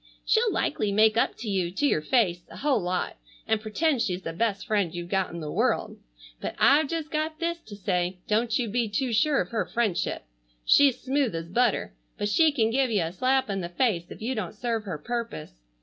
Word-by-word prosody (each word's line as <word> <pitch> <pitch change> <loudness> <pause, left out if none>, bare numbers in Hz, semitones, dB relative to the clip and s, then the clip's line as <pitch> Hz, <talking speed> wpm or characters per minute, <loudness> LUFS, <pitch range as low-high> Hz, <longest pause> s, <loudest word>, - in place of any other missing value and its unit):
She'll 445 0 +3
likely 220 - 0
make 215 +2 +4
up 230 - +1
to 225 - -7
you, 190 -4 0
to 290 - 0
your 155 - +2
face, 175 -2 +2
a - - -11
whole 275 -6 +1
lot, 180 - -2 0.3
and 220 -1 +1
pretend 255 +5 0
she's 180 -3 -1
the 165 - -4
best 205 +2 -1
friend 205 -7 +1
you've 175 0 -6
got 190 -1 +1
in 170 - -7
the 150 -1 -5
world. - - 0 0.4
But - - -5
I've 285 +2 +5
just 320 0 -4
got 310 0 -2
this 340 +1 -2
to 215 -10 -11
say, 180 -2 -1
don't 220 +1 +1
you 245 -3 -1
be 230 +1 0
too 240 +4 -1
sure 280 +6 +3
of 180 - -5
her 225 - 0
friendship. 225 -7 -1 0.4
She's 275 -3 +5
smooth 265 -6 0
as 165 0 -5
butter, 235 - +1 0.2
but 205 - -1
she 315 +8 +4
can 225 -6 +1
give 265 +1 +2
you 205 -6 +1
a 165 - -3
slap 260 +6 +1
in 195 -2 -2
the 170 - -4
face 175 -4 0
if - - -9
you 250 +4 -1
don't 215 -2 -4
serve 225 -1 -2
her 180 -6 -4
purpose. 230 - -5
220 Hz, 220 wpm, -26 LUFS, 185-260 Hz, 0.4 s, I've